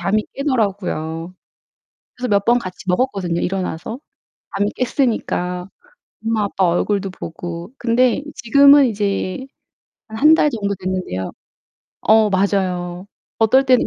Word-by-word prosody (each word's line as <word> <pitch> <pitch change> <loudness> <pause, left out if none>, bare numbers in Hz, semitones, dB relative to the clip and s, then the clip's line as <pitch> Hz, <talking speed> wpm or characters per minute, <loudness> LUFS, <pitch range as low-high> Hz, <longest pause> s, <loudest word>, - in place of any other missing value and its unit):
잠이 205 +5 +1
깨더라고요. 190 - -2 0.8
그래서 250 0 -3
몇 200 -1 +2
번 240 +1 +4
같이 185 -4 -8
먹었거든요 180 -4 0
일어나서. 190 +5 -3 0.6
잠이 205 +1 +1
깼으니까 195 -8 -1 0.6
엄마 225 -2 +1
아빠 195 -2 0
얼굴도 195 +3 0
보고. 170 +2 -7
근데 240 +2 +2
지금은 280 +3 +6
이제 200 +2 -2 0.6
한 220 - -8
1 310 +3 +7
달 300 - +3
정도 200 -5 -2
됐는데요. 185 - -3 0.7
어 220 -1 +4
맞아요. 185 -2 -1 0.3
어떨 260 +5 +4
때는 255 -1 +4
200 Hz, 265 characters per minute, -19 LUFS, 180-235 Hz, 0.8 s, 1